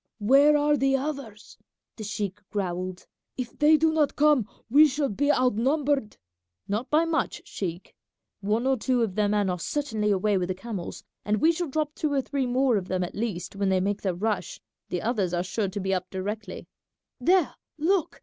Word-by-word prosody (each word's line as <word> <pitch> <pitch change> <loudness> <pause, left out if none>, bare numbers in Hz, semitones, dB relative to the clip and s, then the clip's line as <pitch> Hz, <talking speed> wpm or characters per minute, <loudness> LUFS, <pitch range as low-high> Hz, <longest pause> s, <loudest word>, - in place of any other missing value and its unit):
"Where 275 +7 +5
are 295 0 +3
the 270 0 +2
others?" 270 -7 -6 0.4
the 220 - -7
sheik 205 -2 -4
growled; 185 -2 -3 0.3
"if 250 -2 -5
they 305 +1 +6
do 320 +1 +3
not 305 -2 +1
come 290 -7 +3 0.2
we 295 +6 +7
shall 285 0 -1
be 285 +8 +1
outnumbered." 260 0 +1 0.5
"Not 215 +6 -2
by 315 +2 +3
much, 330 -1 -1
sheik; 175 -2 -5 0.5
one 210 +4 0
or 265 0 +2
two 245 +1 +1
of 210 -5 -2
their 210 +1 +1
men 205 -1 +1
are 180 -1 -1
certainly 220 - -1
away 200 0 +2
with 180 - -1
the 185 - -1
camels, 195 -3 -6 0.2
and 210 +1 +1
we 320 - +5
shall 340 +1 -3
drop 300 +1 -1
two 305 -1 -2
or 275 - +2
three 275 -2 -2
more 250 -1 +2
of 185 -2 -4
them 185 -1 -1
at 175 - -5
least 200 -5 -4
when 200 -1 0
they 190 -1 +3
make 200 +2 -1
their 190 -3 -1
rush; 210 +2 -2 0.3
the 180 - -3
others 205 -6 0
are 175 - 0
sure 200 +2 -2
to 190 +2 -5
be 190 0 -1
up 185 -1 -2
directly. 205 +1 -5 0.5
There, 360 -3 +3 0.2
look! 340 +3 0
220 Hz, 195 wpm, -26 LUFS, 195-285 Hz, 0.5 s, we